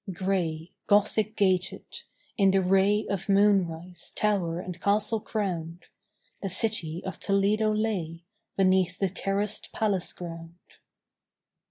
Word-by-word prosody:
Gray, 175 -3 -2 0.2
Gothic 210 +1 +2
gated, 185 -2 +1 0.5
in 195 -1 +4
the 190 0 +3
ray 195 +3 +3
Of 200 0 -3
moonrise, 180 -4 +1
tower 185 -6 0
and 180 -1 -7
castle 215 +2 +1
crowned, 175 -6 -4 0.6
The 195 - -3
city 180 -5 0
of 190 - -5
Toledo 205 +2 +2
lay 185 -7 -2 0.3
Beneath 185 -2 +3
the 195 -2 0
terraced 200 +3 -2
palace 200 -5 0
ground. 165 -1 -9
190 Hz, 115 wpm, -27 LUFS, 175-205 Hz, 0.6 s, in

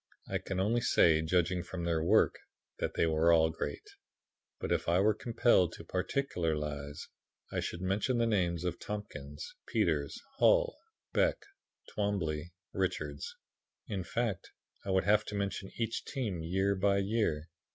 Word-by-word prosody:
I - - -1
can 95 -1 -3
only 110 +5 +2
say, 80 -7 +5
judging 90 +2 +1
from 85 0 -6
their 85 -2 +1
work, - - +5 0.5
that - - -2
they - - +3
were 80 +1 +4
all 80 -1 +5
great, 70 -1 -5 0.7
but - - -3
if - - +1
I 85 +2 +4
were 105 +2 +4
compelled 115 -5 +3
to - - -9
particularize, 75 - -2 0.4
I - - -1
should 85 - -4
mention 100 +7 +1
the 115 - +3
names 90 -6 +1
of 90 -1 -2
Tompkins, 75 -9 -6
Peters, 75 -4 0 0.2
Hull, - - +5 0.4
Beck, - - +2 0.5
Twombly, 90 -6 -1 0.2
Richards; 480 +1 -2 0.5
in 100 - -3
fact, 110 +2 -2 0.3
I - - -6
would 95 0 +3
have 105 +1 +4
to 105 - -5
mention 100 -1 -2
each 115 -1 -1
team 110 - -3
year 95 +4 +1
by 100 +1 +2
year. 100 -6 0
95 Hz, 150 wpm, -32 LUFS, 80-105 Hz, 0.7 s, say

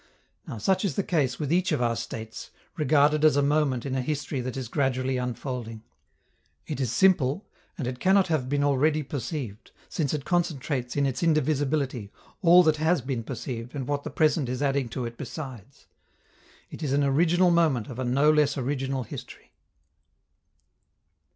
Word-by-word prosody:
Now - - -6
such 190 - +1
is 190 -8 -1
the 200 - 0
case 145 -9 0
with 150 0 -1
each 185 +2 +2
of 150 - +1
our 120 -1 +1
states, 115 -1 -7 0.3
regarded 150 0 +3
as 155 -3 +6
a 145 - +3
moment 140 -4 +1
in 135 - -3
a 130 - 0
history 145 0 -3
that 130 +1 -5
is 130 -3 -4
gradually 130 -1 0
unfolding: 125 -2 -5 0.8
it - - -5
is 125 -4 0
simple, 160 - +3 0.3
and 145 - -3
it 125 0 -4
cannot 190 0 +4
have 150 -6 -1
been 145 0 +1
already 150 +2 +2
perceived, 125 -5 -5 0.2
since 150 -5 -1
it 150 -3 -3
concentrates 145 -7 -1
in 140 -1 +2
its 130 -1 -2
indivisibility 145 - 0 0.3
all 180 0 +7
that 155 -2 +3
has 160 0 +2
been 130 -1 -3
perceived 120 +1 -6
and 135 -3 -4
what 145 -1 -1
the 155 - -5
present 150 -2 +1
is 130 +3 -2
adding 135 -3 0
to 125 +2 -4
it 115 0 -8
besides. 130 - -8 0.9
It - - -9
is 145 -3 -1
an 145 +1 +2
original 170 +6 +3
moment 155 -10 +2
of 125 -1 -8
a - - -1
no 135 +5 +3
less 150 -2 +2
original 135 0 -2
history. - - -10
140 Hz, 175 wpm, -26 LUFS, 125-155 Hz, 0.9 s, all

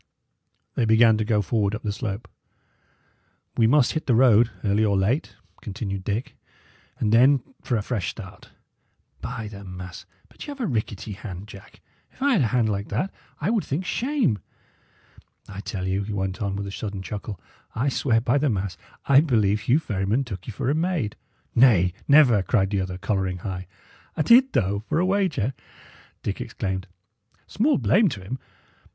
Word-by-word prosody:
They 120 - +1
began 110 0 +5
to - - +1
go 105 -1 +1
forward 105 0 0
up 110 - -7
the 105 - -1
slope. 105 0 -4 1.3
"We 115 - +4
must 130 +1 +4
hit 155 - -3
the 125 - +4
road, 120 -2 +5
early 105 +1 +2
or 100 -2 +2
late," 115 +11 0 0.3
continued 100 -2 -4
Dick; 105 +6 -3 0.6
"and 105 0 0
then 130 +2 +5 0.2
for 120 - 0
a 105 - -2
fresh 105 -5 -2
start. - - -10 0.7
By 115 -3 -5
the 100 -1 -9
mass! 90 -1 -9 0.2
but - - -11
y' - - -4
'ave 275 -3 -5
a - - +1
rickety 110 - -3
hand, 95 -1 -7
Jack. 100 -2 -14 0.3
If - - -25
I 280 +1 +2
had 200 - +3
a 120 - +3
hand 120 0 +2
like 100 -1 -2
that, 145 - -1 0.3
I 170 +8 0
would 225 -4 +1
think 160 +7 -3
shame. 240 - 0 1.1
I 100 0 -8
tell 95 -1 -4
you," 95 +1 0
he 105 +1 -4
went 95 +2 -3
on, 100 -1 -1
with 100 0 -3
a 100 - -6
sudden 100 -1 -5
chuckle, 100 -2 -6 0.4
"I 125 +5 0
swear 125 -4 +2
by 125 +4 +1
the 145 0 +2
mass 95 -5 -2 0.3
I 140 0 +6
believe 110 -9 +2
Hugh 120 +5 +3
Ferryman 105 -3 0
took 95 -8 -8
you 115 - -5
for 130 +5 -1
a - - +2
maid." 160 - -1 0.4
"Nay, 105 -8 +5
never!" 140 -8 +6
cried 95 -1 +1
the 100 -2 +1
other, 95 -1 -4
colouring 95 -1 -1
high. 95 -2 -4 0.5
"A' - - +2
did, 255 - +6
though, 100 +1 0
for - - +1
a 175 - +3
wager!" 185 - +1 0.7
Dick - - -3
exclaimed. 95 0 -4 0.6
"Small 270 +5 +2
blame 205 0 +4
to 100 -9 -6
him. 130 +8 -5
110 Hz, 180 wpm, -24 LUFS, 100-135 Hz, 1.3 s, I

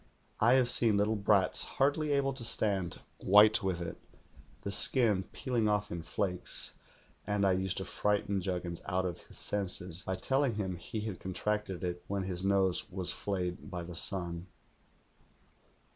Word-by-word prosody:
I 115 +3 +5
have 130 -2 +4
seen 115 -4 +6
little 105 +2 +2
brats, 100 -2 +2
hardly 145 +2 0
able 140 -1 +1
to 130 -2 -5
stand, 100 -5 +2 0.2
white 105 +2 +6
with 95 -3 -2
it, 85 - -5 0.7
the 100 - -3
skin 105 -2 +2
peeling 120 -4 -1
off 105 0 0
in 85 - -4
flakes, 90 +2 -3 0.5
and 105 -1 +1
I 95 - +4
used 95 0 -1
to 95 - -3
frighten 105 -1 0
Jug 90 -1 -2
gins 85 -1 -6
out 95 +1 0
of 90 -1 -4
his - - -8
senses 95 -3 -1
by 95 - -3
telling 135 +1 +1
him 95 -3 -2
he 90 +6 -5
had 105 -3 -5
contracted 95 0 -3
it 90 -1 -3
when 100 -1 -2
his 90 -1 -3
nose 95 -2 +2
was 90 -2 -3
flayed 90 -1 -3
by 90 -3 -5
the 85 0 -8
sun. 85 -1 -1
100 Hz, 165 wpm, -32 LUFS, 90-105 Hz, 0.7 s, seen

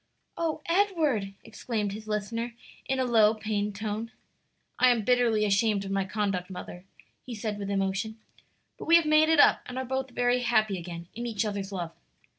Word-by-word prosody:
"O 320 -2 -2
Edward!" 320 - +1
exclaimed 220 -2 -3
his 215 +2 -8
listener 230 +3 -3 0.3
in 265 - -1
a 260 - +1
low, 225 -3 +4
pained 210 -1 -2
tone. 215 +2 -4 0.7
"I 255 - +6
am 235 -3 +2
bitterly 235 -3 +3
ashamed 200 0 +2
of 195 - -5
my 195 -1 0
conduct, 195 -2 -2
mother," 180 0 -8 0.4
he 245 - -7
said 210 -1 -4
with 200 -1 -4
emotion, 195 +2 -1 0.6
"but - - -7
we 335 - +6
have 335 -2 +5
made 310 +1 +4
it 320 -1 +4
up - - +6
and 250 - -7
are 260 - -2
both 265 +1 -2
very 245 0 +1
happy 215 -5 +1
again 170 0 -8
in 240 +2 -5
each 220 -2 -1
other's 200 -1 -4
love. 175 -4 -4
220 Hz, 185 wpm, -28 LUFS, 200-245 Hz, 0.7 s, I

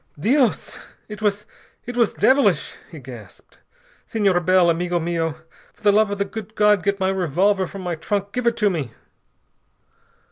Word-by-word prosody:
"Dios! 250 - +1 0.3
It 210 0 -9
was 205 -1 0 0.4
it 245 - -6
was 235 -3 +1
devilish!" 270 +1 +2
he - - -11
gasped. - - -13 0.4
"Senor 200 -5 +1
Bell, 180 0 +4
amigo 175 +1 -1
mio, 165 -2 -2 0.4
for - - -27
the 205 - +5
love 215 +1 +3
of 205 - -3
the 200 - 0
good 220 +1 -8
God 210 -2 +4
get 200 +1 -1
my 190 0 +1
revolver 190 +2 +1
from 195 +1 -9
my 175 -1 -2
trunk. 200 +5 -3
Give 250 +1 -2
it 235 0 +1
to 210 -3 +2
me...." 140 -10 -4
200 Hz, 170 wpm, -22 LUFS, 175-210 Hz, 0.4 s, the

